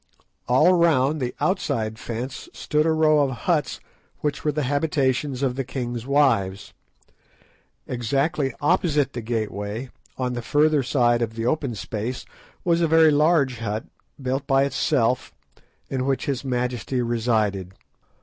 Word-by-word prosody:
All 150 +9 +5
round 155 -4 +3
the 125 -1 -3
outside 110 - -1
fence 125 +3 -6
stood 150 +1 0
a - - +3
row 155 -1 +4
of 140 -2 +2 0.2
huts, - - 0 0.4
which 150 -1 -2
were 150 - +1
the 150 +1 -2
habitations 140 -1 0
of 130 -2 0
the 135 - -2
king's 120 -2 -5
wives. 115 -9 +1 1.1
Exactly 135 +4 -1
opposite 150 -4 +2
the 120 - -4
gateway, 110 +1 -4 0.3
on 125 -1 -1
the 120 - -3
further 150 +4 +3
side 120 -2 +2
of 110 -1 -2
the 115 0 -3
open 135 -2 0
space, 110 +5 -4 0.4
was 170 -1 +2
a 165 - +3
very 160 0 +5
large 145 -5 +3
hut, 110 -1 -3 0.3
built 135 +1 -2
by 135 0 +4
itself, 130 -3 0 0.5
in 130 -1 -2
which 135 -1 0
his 140 -2 -2
majesty 125 -1 -1
resided. 110 -5 0
130 Hz, 140 wpm, -23 LUFS, 120-150 Hz, 1.1 s, All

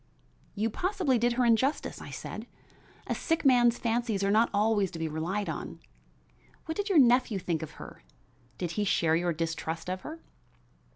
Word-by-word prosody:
"You 220 +2 0
possibly 360 - 0
did 240 +1 +2
her 250 +1 +1
injustice," 240 +5 +1
I - - -9
said. - - -7 0.6
"A - - -1
sick 325 -2 -1
man's 240 -3 +5
fancies 230 -3 -1
are 195 - +2
not 220 +3 +4
always 205 -1 +2
to 170 - -8
be 165 0 -2
relied 170 +7 -2
on. - - -5 0.9
What 320 - -4
did 410 0 -2
your 380 - +3
nephew 245 -4 +5
think 170 -3 -2
of 160 - -7
her? - - -11 0.6
Did 175 -2 -3
he 210 +4 -1
share 165 -5 +2
your 175 +1 +1
distrust 165 +1 -3
of 185 0 -4
her?" 320 +2 -9
220 Hz, 175 wpm, -29 LUFS, 175-250 Hz, 0.9 s, man's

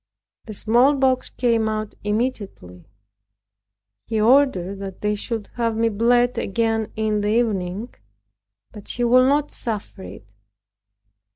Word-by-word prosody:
The 215 - -8
smallpox 260 +4 +2
came 230 -3 0
out 215 -1 -4
immediately. 205 - -4 1.2
He 220 - -1
ordered 220 -6 +3
that 195 -1 -8
they 210 0 0
should 215 +1 -5
have 230 -2 0
me 230 0 +2
bled 240 +3 +2
again 225 +1 -1
in 215 -1 0
the 205 - -1
evening, 210 -1 -1 0.8
but 210 -2 -12
she 245 - -2
would 255 +2 +5
not 290 +1 +1
suffer 210 -4 -6
it. 105 - -10
225 Hz, 120 wpm, -22 LUFS, 205-245 Hz, 1.2 s, would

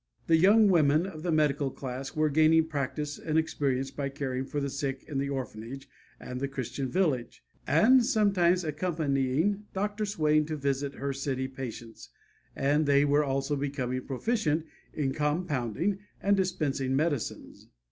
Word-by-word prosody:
The 165 - +4
young 205 +6 +6
women 160 -3 +4
of 170 -5 -7
the 175 +1 -1
medical 150 -3 +2
class 135 +1 -6
were 155 -1 +2
gaining 160 +2 +5
practice 150 -1 -3
and 155 0 -1
experience 135 -4 0
by 140 -1 -3
caring 135 -2 -3
for 145 - -3
the 140 - -1
sick 135 -1 -3
in 140 -3 -2
the 140 0 -1
orphanage 135 0 -6 0.3
and 125 0 -6
the 140 - -1
Christian 135 0 -4
village, 150 -9 -1 0.2
and 255 +3 +5
sometimes 195 -7 +3
accompanying 155 +3 0
Dr. 205 +2 -1
Swain 155 -6 +2
to 155 - -3
visit 140 0 -2
her 140 0 -3
city 135 -1 -2
patients, 120 -3 -8 0.5
and 145 +2 +1
they 140 0 +4
were 145 +1 +3
also 135 +1 -1
becoming 135 -3 -2
proficient 160 - 0 0.3
in 135 -3 -1
compounding 150 - -1 0.2
and 200 +1 +3
dispensing 145 -8 0
medicines. 145 -4 -2
145 Hz, 150 wpm, -29 LUFS, 135-165 Hz, 0.5 s, young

